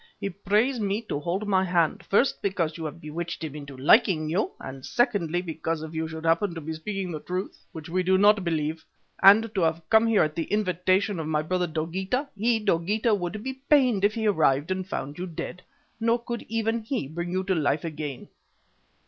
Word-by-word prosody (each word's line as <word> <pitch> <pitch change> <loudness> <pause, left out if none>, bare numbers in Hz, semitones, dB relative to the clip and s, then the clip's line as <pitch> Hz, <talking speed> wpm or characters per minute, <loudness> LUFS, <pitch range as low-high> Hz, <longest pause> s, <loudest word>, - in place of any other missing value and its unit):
He 195 - -3
prays 210 +7 +1
me 205 +2 -1
to 145 - -1
hold 180 +7 -2
my 190 -2 +3
hand, 175 -3 +1
first 240 +7 +2
because 170 -5 -1
you 165 - -6
have 155 +2 -6
bewitched 170 +2 -5
him 155 -3 -4
into 140 -2 -9
liking 155 - +4
you 195 +6 +1
and 135 0 -8
secondly 185 - 0
because 160 -1 -3
if 160 0 -7
you 160 0 -2
should 160 0 -7
happen 170 +3 +2
to 165 - -5
be 160 +2 -5
speaking 190 +3 -4
the 155 - -4
truth 180 +4 -5
which 160 -5 -8
we 185 +2 0
do 185 +1 +3
not 205 0 +5
believe 160 -2 -2 0.4
and 215 +3 +7
to 190 - 0
have 165 0 0
come 220 +1 +6
here 225 -3 +4
at 155 0 -1
the 165 0 -2
invitation 190 -1 +1
of 160 - -3
my 155 -1 0
brother 180 +2 0
Dogeetah, 190 - -2
he, 225 +3 +2
Dogeetah, 210 +3 +1
would 200 +2 -2
be 265 +1 -3 0.2
pained 255 -9 +4
if 205 +1 +3
he 225 -1 -2
arrived 155 -5 +2
and 185 0 -2
found 145 +1 -4
you 180 - -3
dead, 175 +1 -6 0.4
nor 230 +1 +2
could 235 -1 -5
even 225 +1 0
he 225 - -3
bring 170 +4 -5
you 185 +1 -1
to 190 0 0
life 150 -3 +1
again. 150 -4 -5
180 Hz, 210 wpm, -26 LUFS, 160-210 Hz, 0.4 s, and